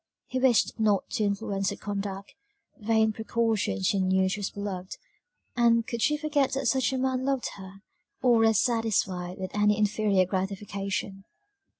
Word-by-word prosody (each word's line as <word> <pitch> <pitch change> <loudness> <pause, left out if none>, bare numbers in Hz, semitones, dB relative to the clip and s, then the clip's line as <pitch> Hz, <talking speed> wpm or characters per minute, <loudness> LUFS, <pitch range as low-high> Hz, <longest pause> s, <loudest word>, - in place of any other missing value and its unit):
He 255 - -3
wished 250 -3 +2
not 210 -3 +2
to 235 -5 0
influence 200 -1 -1
her - - -4
conduct 200 -1 -5 0.5
vain 220 0 +2
precaution; 220 - -1
she 195 - +2
knew 190 0 +2
she 190 +2 -2
was 200 - -2
beloved; 190 -2 -6 0.6
and 230 -2 +3
could 235 -1 -4
she 300 +5 +2
forget 295 -3 0
that 270 0 -2
such 260 +1 +2
a 265 - -1
man 260 0 0
loved 270 -2 -1
her, 195 0 -12 0.4
or 240 -2 +5
rest 225 -2 +4
satisfied 195 -7 -1
with 185 0 -5
any 210 0 +2
inferior 210 -2 +2
gratification. 195 +1 -4
210 Hz, 160 wpm, -27 LUFS, 195-235 Hz, 0.6 s, or